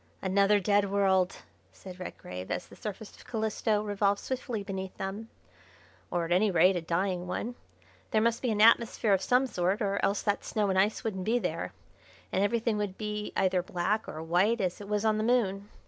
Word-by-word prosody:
"Another 200 +2 +3
dead 200 +1 +2
world!" 190 -2 +1 0.3
said 185 -1 -11
Redgrave, 90 - -7
as - - -2
the - - -15
surface 210 0 -7
of - - -16
Calisto 220 -1 0
revolved 205 -1 +1
swiftly 245 -5 -4
beneath 190 -1 -5
them, 200 +4 -5 0.8
"or 175 -1 -1
at 165 - -7
any 195 +4 +4
rate 185 +1 +4
a 175 - -1
dying 180 +2 -1
one. 220 +6 -3 0.6
There 215 - +2
must 230 +1 +1
be 250 - 0
an 210 -2 +1
atmosphere 225 -1 +5
of 190 - +2
some 250 +5 +3
sort, 190 -4 0
or 200 -3 -1
else 200 0 +1
that 205 -1 0
snow 210 -2 0
and 190 - +2
ice 210 +5 +1
wouldn't 190 -5 -3
be 230 +3 +2
there, - - -3 0.6
and 190 - +1
everything 225 +1 +1
would 200 -2 -3
be 210 -1 -4
either 185 -1 +2
black 185 +5 -1
or 155 +1 -6
white 185 +8 +2
as 185 0 -2
it 200 - -9
was 210 +1 0
on 215 -1 +2
the - - 0
Moon. 210 -4 +1
200 Hz, 195 wpm, -29 LUFS, 190-215 Hz, 0.8 s, atmosphere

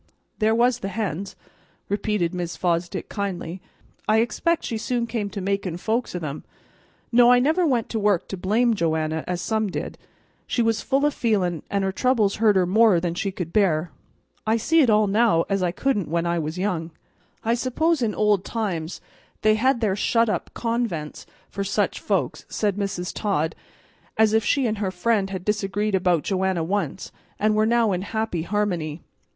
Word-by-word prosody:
"There 220 0 +3
was 245 +1 +3
the 195 - -4
hens," 200 -2 -3 0.5
repeated 205 -4 0
Mrs. 175 -2 -4
Fosdick 175 -1 -1
kindly. 190 -3 -4 0.5
"I 215 - +4
expect 275 +9 +1
she 225 - -3
soon 240 +1 -1
came 225 -3 -3
to 200 0 -5
makin' 195 -3 -2
folks 225 +3 -2
o' - - 0
them. 155 -4 -5 0.7
No, 240 0 +6
I 250 - +7
never 315 +7 +2
went 245 -5 +1
to 225 - -2
work 205 -4 +1
to - - -3
blame 220 +6 +2
Joanna, 160 -4 -1
as 180 -1 -2
some 220 -1 0
did. - - -5 0.5
She 240 - +1
was 225 -1 +1
full 275 +2 +1
o' 295 - +3
feeling, 185 - 0
and 200 -1 0
her 190 - 0
troubles 220 -2 +1
hurt 215 -2 +4
her 185 -1 +4
more 205 0 +4
than 170 0 -2
she 195 +3 -2
could 175 -3 -6
bear. 175 -6 +2 0.6
I 220 +1 +3
see 325 +8 +3
it 260 - +4
all 215 0 +4
now 205 -4 +3
as 195 -1 +1
I 180 - +2
couldn't 210 - 0
when 170 +1 0
I 170 0 0
was 155 +2 -4
young." 180 -4 -1 0.5
"I 230 - +2
suppose 265 +6 +1
in 225 -3 0
old 210 -3 +2
times 185 -9 -3 0.4
they 215 0 +5
had 245 +3 +2
their 205 -4 +1
shut 230 +2 +2
up - - -2
convents 230 -10 -3 0.2
for 200 - -5
just 200 0 -2
such - - +1
folks," - - -1
said 205 -3 0
Mrs. 195 -3 -3
Todd, 165 -7 -1 0.6
as 220 -1 +4
if 220 0 +3
she 275 +1 +2
and 215 -2 -1
her 200 -3 0
friend 195 +2 0
had 190 -1 -5
disagreed 210 0 -1
about 180 -4 +2
Joanna 190 -3 0
once, 200 +5 -2 0.3
and 215 +1 +2
were 215 +1 +2
now 230 -2 +3
in 180 -1 -1
happy 220 -3 -2
harmony. 175 -5 -2
205 Hz, 190 wpm, -24 LUFS, 180-225 Hz, 0.7 s, I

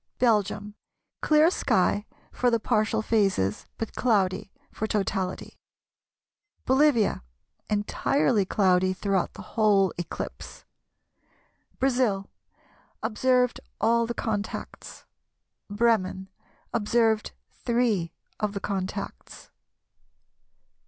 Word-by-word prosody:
Belgium, 210 -3 +1 0.5
Clear 310 +2 +5
sky 210 - +1 0.2
for 250 - +1
the 230 -1 +2
partial 220 -1 +1
phases, 195 - +1
but 225 - -4
cloudy 195 -5 +1 0.2
for 220 - -3
totality. 195 -3 -2 1.1
Bolivia, 260 -5 +3 0.5
Entirely 210 +2 +1
cloudy 185 -1 +2
throughout 195 -1 -1
the - - -9
whole 205 -4 +3
eclipse. 175 - -7 1.1
Brazil, 245 -7 +1 0.7
Observed 250 +2 +2 0.2
all 230 +1 +2
the 235 - -4
contacts. 210 -2 -5 0.6
Bremen, 205 -3 +1 0.4
Observed 225 -1 +1 0.2
three 230 -9 0 0.3
of 210 -2 -1
the 200 - -3
contacts. 190 -2 -5
215 Hz, 85 wpm, -26 LUFS, 195-235 Hz, 1.1 s, Clear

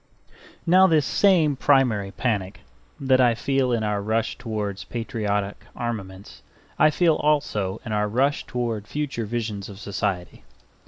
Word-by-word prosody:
Now 185 +2 +6
this 155 -5 +3
same 160 - +3
primary 125 -8 +2
panic 100 -3 -2 0.4
that 130 -1 +3
I 120 -2 +4
feel 135 +1 0
in 115 -2 0
our 105 -1 -1
rush 110 +2 -1
towards 105 -4 -4
patriotic 105 -3 -3
armaments 100 -5 -6 0.4
I 155 - +6
feel 160 0 +2
also 110 -10 0
in 110 - -5
our 105 0 +1
rush 135 +7 +1
towards 115 -4 -3
future 140 -7 -3
visions 110 -3 -4
of 100 -1 -10
society. 100 -3 -3
115 Hz, 140 wpm, -24 LUFS, 105-135 Hz, 0.4 s, Now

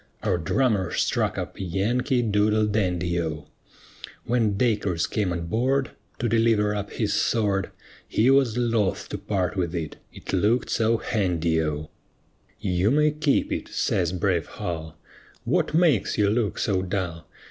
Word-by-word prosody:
Our 95 -5 +1
drummer 100 +2 +1
struck - - 0
up - - -5
"Yankee 120 - 0
Doodle 105 0 +2
Dandy" 90 -5 0
O; 80 -3 -4 0.8
When 110 -4 +1
Dacres 105 -7 +1
came 105 -4 -1
on 85 -1 -3
board 130 +8 0 0.3
To 120 - -1
deliver 115 -2 +2
up 100 -1 -3
his - - -1
sword, 100 -4 +1 0.4
He 120 +5 +3
was 135 -4 +3
loth 115 -5 0
to 105 - -4
part 95 -4 -1
with 90 -2 -1
it, 80 -3 -4
it - - -8
looked 105 +6 +2
so 115 0 +2
handy 85 -8 0
O. 75 -1 -3 0.7
"You 90 +1 +1
may 150 +3 +3
keep 150 -1 +1
it," - - -3
says 85 -2 0
brave 90 -3 0
Hull. 80 -2 -6 0.5
"What - - 0
makes 155 - +3
you 100 -1 +3
look 110 -2 0
so 95 -3 0
dull? 90 -4 -4
100 Hz, 145 wpm, -25 LUFS, 90-115 Hz, 0.8 s, He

